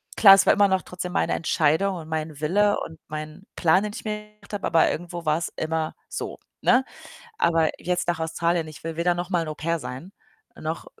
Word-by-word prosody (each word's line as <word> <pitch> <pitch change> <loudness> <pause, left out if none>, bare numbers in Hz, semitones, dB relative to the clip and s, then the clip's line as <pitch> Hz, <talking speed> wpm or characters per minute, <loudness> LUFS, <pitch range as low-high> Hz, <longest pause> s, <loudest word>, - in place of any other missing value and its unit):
Klar, 195 -3 +9
es 195 0 +5
war - - +7
immer 205 -1 +5
noch 190 -1 +1
trotzdem 180 0 -6
meine 195 - +1
Entscheidung 165 +4 +1
und 160 -2 -8
mein 155 -2 -3
Wille 205 +6 +3
und 160 -1 -9
mein 155 +4 -7
Plan, 175 +3 +3
den 210 -1 -4
ich - - -7
mir 210 -1 -5
gemacht 210 -1 -19
habe, 200 - -3
aber 165 -1 +4
irgendwo 175 0 -5
war's 155 +2 0
immer 160 0 -1 0.2
so, - - -5 0.2
ne? 255 - +4 0.6
Aber 165 -2 +3
jetzt 180 0 -1
nach 170 -1 0
Australien, 165 0 0
ich 155 - -12
will 165 0 -4
weder 175 +1 +1
noch 175 +2 -4
mal 175 - +2
'n - - -7
Au-pair 160 +2 -2
sein, 140 +9 -7 0.4
noch - - -5
170 Hz, 205 wpm, -25 LUFS, 160-190 Hz, 0.6 s, Klar